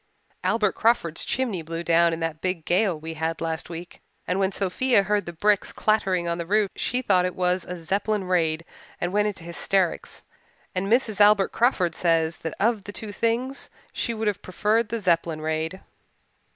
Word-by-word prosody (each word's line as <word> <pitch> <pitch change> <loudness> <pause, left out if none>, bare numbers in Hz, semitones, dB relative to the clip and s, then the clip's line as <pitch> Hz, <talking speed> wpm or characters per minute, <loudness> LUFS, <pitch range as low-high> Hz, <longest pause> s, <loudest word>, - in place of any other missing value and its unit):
Albert 210 -3 +2
Crawford's 220 -8 +1
chimney 235 -9 -1
blew 165 +1 -5
down 170 0 +4
in 165 0 -4
that 165 -1 -3
big 180 -4 -2
gale 185 -3 +2
we 160 +1 -6
had 160 +1 -2
last 165 0 -3
week, 170 +1 -8 0.3
and 180 +2 0
when 190 0 +2
Sophia 200 +4 +2
heard 205 -1 0
the - - -3
bricks 205 +4 +1
clattering 190 -5 +1
on 170 0 -1
the 170 - -3
roof 205 0 +2
she 250 +2 -1
thought 185 -5 +3
it 180 0 -2
was 180 0 0
a 180 - -6
Zeppelin 195 +5 -1
raid 165 -3 0 0.3
and 175 +1 -2
went 210 +1 +3
into 195 -5 -5
hysterics. 175 +1 -1 0.5
And 190 +1 -1
Mrs. 225 -4 +2
Albert 205 -1 +6
Crawford 195 -8 +2
says 165 -1 +1
that 160 - -5
of 215 -1 +1
the 205 - -6
two 210 0 -6
things 235 +6 -1 0.2
she 235 - -2
would 220 0 -3
have 205 -2 -1
preferred 210 +4 0
the 230 +1 -2
Zeppelin 170 -3 +1
raid." 160 +3 -2
185 Hz, 185 wpm, -25 LUFS, 165-210 Hz, 0.5 s, Albert